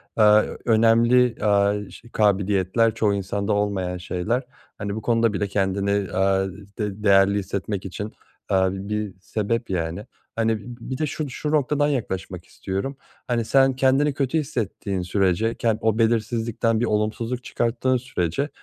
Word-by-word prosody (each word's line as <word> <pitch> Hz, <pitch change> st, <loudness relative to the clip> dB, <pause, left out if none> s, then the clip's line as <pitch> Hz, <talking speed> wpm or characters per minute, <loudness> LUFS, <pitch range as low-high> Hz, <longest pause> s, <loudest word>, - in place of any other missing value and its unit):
aaa, 105 Hz, -1 st, +6 dB
ö -, -, -6 dB
önemli, 115 Hz, +2 st, +4 dB
aaa, 105 Hz, 0 st, +2 dB
ş 120 Hz, -, -14 dB
kabiliyetler, 100 Hz, +1 st, +2 dB
çoğu 105 Hz, -2 st, +2 dB
insanda 100 Hz, +1 st, -1 dB
olmayan 100 Hz, -3 st, -1 dB
şeyler. 90 Hz, +8 st, -2 dB, 0.3 s
Hani, 100 Hz, 0 st, -4 dB
bu 110 Hz, -, -4 dB
konuda 115 Hz, -1 st, +2 dB
bile 100 Hz, 0 st, -1 dB
kendini, 100 Hz, 0 st, 0 dB
aaa, 95 Hz, 0 st, +2 dB, 0.3 s
d 105 Hz, -1 st, -4 dB
değerli 100 Hz, 0 st, +5 dB
hissetmek 100 Hz, 0 st, -4 dB
için, 100 Hz, +3 st, -5 dB, 0.4 s
aaa, 95 Hz, -1 st, +2 dB
bi 95 Hz, +1 st, -6 dB
bir 105 Hz, -2 st, -2 dB
sebep, 110 Hz, +4 st, -2 dB
yani. 85 Hz, +2 st, -2 dB, 0.3 s
Hani, 115 Hz, -1 st, +1 dB
bi -, -, -13 dB
bi 120 Hz, -, -10 dB
bir 130 Hz, -, -3 dB
de 155 Hz, -, 0 dB
şu 150 Hz, 0 st, -4 dB
şu 150 Hz, +4 st, -4 dB
noktadan 145 Hz, -1 st, +2 dB
yaklaşmak 95 Hz, -, -3 dB
istiyorum: 100 Hz, +9 st, -4 dB, 0.3 s
Hani, 120 Hz, -2 st, 0 dB
sen 135 Hz, +2 st, +4 dB
kendini 135 Hz, +3 st, +3 dB
kötü 135 Hz, +3 st, 0 dB
hissettiğin 105 Hz, -8 st, -3 dB
sürece 95 Hz, +4 st, +1 dB
ken 115 Hz, -2 st, +1 dB
o 110 Hz, -1 st, +1 dB
belirsizlikten 115 Hz, 0 st, +1 dB
bir 120 Hz, -, +1 dB
olumsuzluk 115 Hz, +3 st, -1 dB
çıkarttığın 125 Hz, +2 st, 0 dB
sürece, 120 Hz, -, -2 dB
105 Hz, 155 wpm, -23 LUFS, 100-120 Hz, 0.4 s, aaa